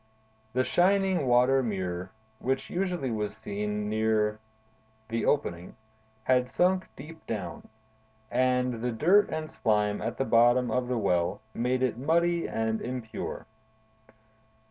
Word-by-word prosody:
The 130 +1 +2
shining 185 -2 +2
water 125 +2 +4
mirror, 95 -5 -3 0.3
which 130 +1 -2
usually 180 -8 -1
was 105 -1 -3
seen 105 -1 -3
very - - -3
near 110 -1 +1 0.7
the 115 0 -1
opening, 90 - -1 0.5
had 125 0 +2
sunk 185 +3 +2
deep 160 +4 -11
down, 100 -6 -5 0.6
and 125 -2 +1
the 125 - 0
dirt 180 - +4
and 155 0 -3
slime 105 -2 +1
at 115 +2 -3
the 135 - 0
bottom 120 +1 +4
of 125 +1 0
the 125 -1 -1
well 90 -2 +1
made 125 +2 0
it 120 -2 0
muddy 170 +4 +1
and 110 0 -1
impure. 120 -3 -5
125 Hz, 130 wpm, -28 LUFS, 110-135 Hz, 0.7 s, water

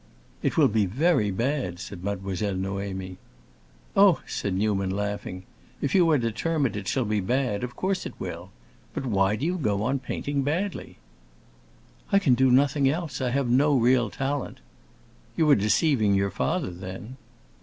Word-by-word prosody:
"It - - -1
will - - +6
be 105 -2 +1
very 130 - +2
bad," 115 -3 -1
said 90 0 -8
Mademoiselle 100 0 -2
Noémie. 95 -1 -4 0.8
"Oh," 195 -4 +6
said 100 -2 -3
Newman, 100 -1 0
laughing, 100 -2 -4 0.4
"if 140 - -2
you 175 -3 +5
are 155 - +4
determined 130 +2 -1
it 100 -2 -5
shall 130 -3 0
be 105 0 0
bad, 120 +1 -1
of 125 0 -5
course 190 0 -1
it - - -11
will. - - -6 0.5
But - - -3
why 100 -3 +2
do 130 - -3
you 180 +2 -1
go 105 -7 0
on 135 +4 0
painting 140 +2 -3
badly?" 170 +9 -3 1.1
"I 200 - +5
can 150 -10 +3
do 130 +2 +4
nothing 135 +2 +3
else; 155 -3 -3
I 125 - 0
have 135 +1 0
no 140 +3 +4
real 125 0 +3
talent." 140 0 -3 0.8
"You 160 - +3
are - - +8
deceiving 110 0 +2
your 100 0 +1
father, 90 - -1
then." 95 +8 -8
120 Hz, 165 wpm, -26 LUFS, 100-140 Hz, 1.1 s, are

